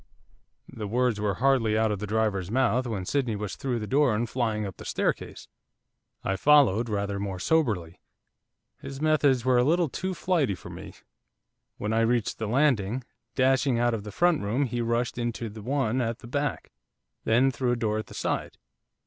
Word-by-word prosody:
The 105 Hz, -2 st, -6 dB
words 120 Hz, -1 st, 0 dB
were 100 Hz, -3 st, 0 dB
hardly 120 Hz, -3 st, +2 dB
out 110 Hz, -1 st, +2 dB
of 105 Hz, -, -2 dB
the 105 Hz, -, -4 dB
driver's 105 Hz, -4 st, 0 dB
mouth 125 Hz, +1 st, +1 dB
when 100 Hz, -5 st, -3 dB
Sydney 125 Hz, -1 st, 0 dB
was 105 Hz, -1 st, -4 dB
through 130 Hz, -3 st, -2 dB
the 110 Hz, -, -4 dB
door 135 Hz, -1 st, +2 dB
and 120 Hz, +3 st, -1 dB
flying 110 Hz, -3 st, -1 dB
up 95 Hz, -, -7 dB
the -, -, -10 dB
staircase. -, -, -2 dB, 0.8 s
I 95 Hz, -, -1 dB
followed 125 Hz, -6 st, +4 dB
rather 100 Hz, -1 st, -2 dB
more 100 Hz, -2 st, -3 dB
soberly, 100 Hz, -, 0 dB, 0.8 s
his 135 Hz, 0 st, -8 dB
methods 145 Hz, -5 st, +2 dB
were 130 Hz, -1 st, +4 dB
a -, -, +4 dB
little 165 Hz, +3 st, +2 dB
too 185 Hz, +6 st, -3 dB
flighty 160 Hz, -, +1 dB
for -, -, -11 dB
me. -, -, -10 dB, 0.8 s
When 105 Hz, +2 st, -2 dB
I 110 Hz, -, +2 dB
reached 115 Hz, 0 st, +1 dB
the 110 Hz, -, -2 dB
landing, 125 Hz, -2 st, +1 dB, 0.3 s
dashing 130 Hz, -1 st, +2 dB
out 120 Hz, 0 st, +2 dB
of 110 Hz, -, -2 dB
the 105 Hz, -, -7 dB
front 175 Hz, -, +2 dB
room 115 Hz, +8 st, 0 dB
he 120 Hz, -1 st, -2 dB
rushed 120 Hz, +1 st, -1 dB
into 120 Hz, -1 st, -3 dB
the 105 Hz, +1 st, -10 dB
one 130 Hz, 0 st, 0 dB
at 115 Hz, -1 st, -2 dB
the 120 Hz, -, -12 dB
back, 145 Hz, +3 st, -3 dB, 0.5 s
then 125 Hz, +4 st, +3 dB
through 125 Hz, -1 st, 0 dB
a -, -, +1 dB
door 110 Hz, -2 st, -1 dB
at 110 Hz, -, -6 dB
the -, -, -12 dB
side. -, -, -3 dB
120 Hz, 190 wpm, -27 LUFS, 105-135 Hz, 0.8 s, followed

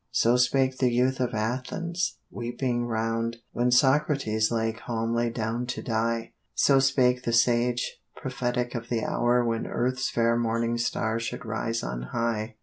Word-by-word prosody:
So 120 Hz, +2 st, +3 dB
spake 130 Hz, +1 st, +2 dB
the 125 Hz, -2 st, +3 dB
youth 125 Hz, +2 st, +1 dB
of 125 Hz, -3 st, -1 dB
Athens, 130 Hz, +11 st, -2 dB
weeping 120 Hz, 0 st, -2 dB
round, 115 Hz, 0 st, -1 dB
When 120 Hz, +1 st, +1 dB
Socrates 130 Hz, -4 st, +3 dB
lay 115 Hz, -1 st, 0 dB
calmly 115 Hz, +1 st, -1 dB
down 115 Hz, +1 st, -2 dB
to 125 Hz, -, -4 dB
die; 115 Hz, 0 st, -1 dB, 0.2 s
So 135 Hz, -1 st, +5 dB
spake 130 Hz, -2 st, +3 dB
the 120 Hz, -2 st, -2 dB
sage, 120 Hz, +1 st, +2 dB, 0.2 s
prophetic 125 Hz, -1 st, -2 dB
of 120 Hz, -1 st, -5 dB
the 115 Hz, -2 st, -1 dB
hour 120 Hz, +1 st, +2 dB
When 115 Hz, -1 st, -1 dB
earth's 130 Hz, +2 st, -1 dB
fair 115 Hz, 0 st, +2 dB
morning 115 Hz, 0 st, 0 dB
star 115 Hz, -1 st, 0 dB
should 115 Hz, +1 st, -5 dB
rise 115 Hz, +1 st, -2 dB
on -, -, -4 dB
high. 115 Hz, -1 st, -1 dB
120 Hz, 150 wpm, -27 LUFS, 115-125 Hz, 0.2 s, So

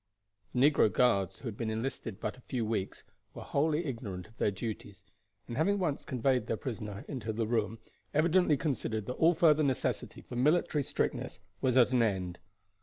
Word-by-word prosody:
The 135 Hz, +4 st, +6 dB
negro 110 Hz, -7 st, +3 dB
guards, 100 Hz, -7 st, +2 dB
who 130 Hz, -, -8 dB
had 110 Hz, -, -4 dB
been 115 Hz, 0 st, -3 dB
enlisted 110 Hz, -2 st, -4 dB
but -, -, -3 dB
a 125 Hz, -, -17 dB
few 120 Hz, -2 st, -2 dB
weeks, 105 Hz, -3 st, -3 dB, 0.3 s
were -, -, -7 dB
wholly 155 Hz, +3 st, +1 dB
ignorant 110 Hz, -9 st, -5 dB
of 110 Hz, +1 st, -22 dB
their -, -, +3 dB
duties, 100 Hz, -1 st, -6 dB, 0.4 s
and 120 Hz, -, -5 dB
having 195 Hz, +7 st, +2 dB
once 170 Hz, -7 st, -1 dB
conveyed 125 Hz, -2 st, +1 dB
their 115 Hz, -, -1 dB
prisoner 105 Hz, -5 st, -5 dB
into 120 Hz, -6 st, -4 dB
the 110 Hz, +1 st, -1 dB
room, 110 Hz, -1 st, 0 dB, 0.3 s
evidently 160 Hz, 0 st, +3 dB
considered 115 Hz, -7 st, -2 dB
that 125 Hz, -, -3 dB
all 165 Hz, +5 st, +4 dB
further 155 Hz, -2 st, +5 dB
necessity 135 Hz, -4 st, -1 dB
for -, -, -9 dB
military 150 Hz, +3 st, +2 dB
strictness -, -, -2 dB, 0.2 s
was 130 Hz, -1 st, +2 dB
at 125 Hz, 0 st, +6 dB
an 125 Hz, -2 st, +3 dB
end. 95 Hz, -5 st, -1 dB
125 Hz, 180 wpm, -31 LUFS, 110-145 Hz, 0.4 s, The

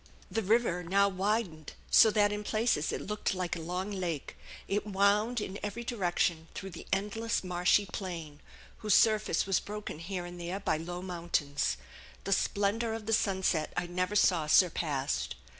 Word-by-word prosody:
The 225 Hz, -, 0 dB
river 215 Hz, -3 st, +2 dB
now 200 Hz, +4 st, +3 dB
widened 190 Hz, -5 st, -2 dB, 0.2 s
so 220 Hz, -, +8 dB
that 205 Hz, -1 st, +3 dB
in 210 Hz, 0 st, -3 dB
places 215 Hz, -8 st, +1 dB
it -, -, -3 dB
looked 210 Hz, -1 st, -2 dB
like 180 Hz, -2 st, -2 dB
a -, -, -5 dB
long 180 Hz, +5 st, -3 dB
lake; 175 Hz, -7 st, -3 dB, 0.3 s
it 200 Hz, +1 st, 0 dB
wound 210 Hz, +4 st, +2 dB
in 200 Hz, -1 st, -5 dB
every 210 Hz, +3 st, -4 dB
direction 175 Hz, -7 st, 0 dB
through 195 Hz, -, -6 dB
the -, -, -10 dB
endless 210 Hz, +4 st, -1 dB
marshy 180 Hz, +3 st, +2 dB
plain, 170 Hz, -6 st, -6 dB, 0.4 s
whose 210 Hz, -3 st, +2 dB
surface 215 Hz, -6 st, +3 dB
was 195 Hz, -1 st, +2 dB
broken 210 Hz, -6 st, -6 dB
here 175 Hz, +1 st, -4 dB
and 175 Hz, 0 st, -8 dB
there 175 Hz, +3 st, -3 dB
by 195 Hz, -, 0 dB
low 175 Hz, +3 st, -6 dB
mountains. 170 Hz, -, -1 dB, 0.5 s
The 195 Hz, -, +1 dB
splendor 210 Hz, +4 st, 0 dB
of 225 Hz, -1 st, -7 dB
the 225 Hz, -, 0 dB
sunset 190 Hz, -7 st, +1 dB
I 175 Hz, -, 0 dB
never 185 Hz, +3 st, -2 dB
saw 170 Hz, -6 st, +3 dB
surpassed. 145 Hz, -, +2 dB
190 Hz, 165 wpm, -31 LUFS, 175-210 Hz, 0.5 s, so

